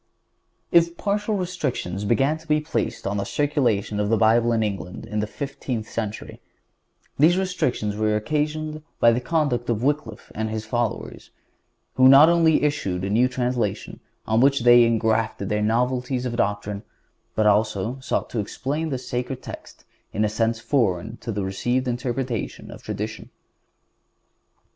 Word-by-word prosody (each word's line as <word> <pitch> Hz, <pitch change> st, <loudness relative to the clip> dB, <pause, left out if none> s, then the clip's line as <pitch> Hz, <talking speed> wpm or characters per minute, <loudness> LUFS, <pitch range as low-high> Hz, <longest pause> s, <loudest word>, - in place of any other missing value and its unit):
(152) 170 Hz, 0 st, +5 dB
If -, -, -32 dB
partial 205 Hz, +1 st, -1 dB
restrictions 140 Hz, -, -3 dB
began 135 Hz, +8 st, +2 dB
to 160 Hz, -, -18 dB
be 150 Hz, -1 st, +3 dB
placed 150 Hz, -7 st, -3 dB
on 100 Hz, +1 st, -1 dB
the 100 Hz, -, -1 dB
circulation 120 Hz, -9 st, 0 dB
of 105 Hz, 0 st, 0 dB
the 115 Hz, -, +3 dB
Bible 115 Hz, +2 st, +4 dB
in 115 Hz, -1 st, +2 dB
England 95 Hz, -3 st, -4 dB
in 105 Hz, 0 st, -3 dB
the 105 Hz, -, -1 dB
fifteenth 125 Hz, -3 st, -5 dB
century, 110 Hz, -1 st, -5 dB, 0.8 s
these 165 Hz, +5 st, +5 dB
restrictions 130 Hz, -, -1 dB
were 105 Hz, 0 st, +1 dB
occasioned 155 Hz, +6 st, -2 dB, 0.2 s
by 115 Hz, -, +6 dB
the 120 Hz, +2 st, 0 dB
conduct 125 Hz, -5 st, 0 dB
of 115 Hz, 0 st, 0 dB
Wycliffe 135 Hz, -6 st, -2 dB
and 110 Hz, +1 st, -2 dB
his 110 Hz, 0 st, -4 dB
followers, 120 Hz, 0 st, -3 dB, 0.7 s
who 130 Hz, 0 st, +7 dB
not 140 Hz, +4 st, +9 dB
only 165 Hz, -3 st, +4 dB
issued 100 Hz, -12 st, -1 dB
a 100 Hz, -, -2 dB
new 120 Hz, +4 st, +4 dB
translation, 125 Hz, -4 st, -2 dB, 0.3 s
on 110 Hz, +1 st, +2 dB
which 135 Hz, 0 st, +4 dB
they 120 Hz, 0 st, +7 dB
engrafted 110 Hz, -3 st, 0 dB
their 105 Hz, 0 st, 0 dB
novelties 125 Hz, +3 st, 0 dB
of 120 Hz, -1 st, -2 dB
doctrine, 105 Hz, -2 st, -1 dB, 0.5 s
but 110 Hz, -, +2 dB
also 105 Hz, +3 st, +1 dB
sought 130 Hz, -, -2 dB
to 115 Hz, -, -2 dB
explain 145 Hz, +9 st, -3 dB
the 135 Hz, -, -2 dB
sacred 125 Hz, +1 st, -4 dB
text -, -, -10 dB, 0.3 s
in 105 Hz, -, +1 dB
a -, -, 0 dB
sense 115 Hz, +1 st, 0 dB
foreign 110 Hz, -3 st, 0 dB
to 115 Hz, -, -6 dB
the 100 Hz, -2 st, -2 dB
received 120 Hz, +7 st, -1 dB
interpretation 120 Hz, -1 st, -3 dB
of -, -, -11 dB
tradition. 105 Hz, 0 st, -5 dB
120 Hz, 160 wpm, -23 LUFS, 105-140 Hz, 0.8 s, not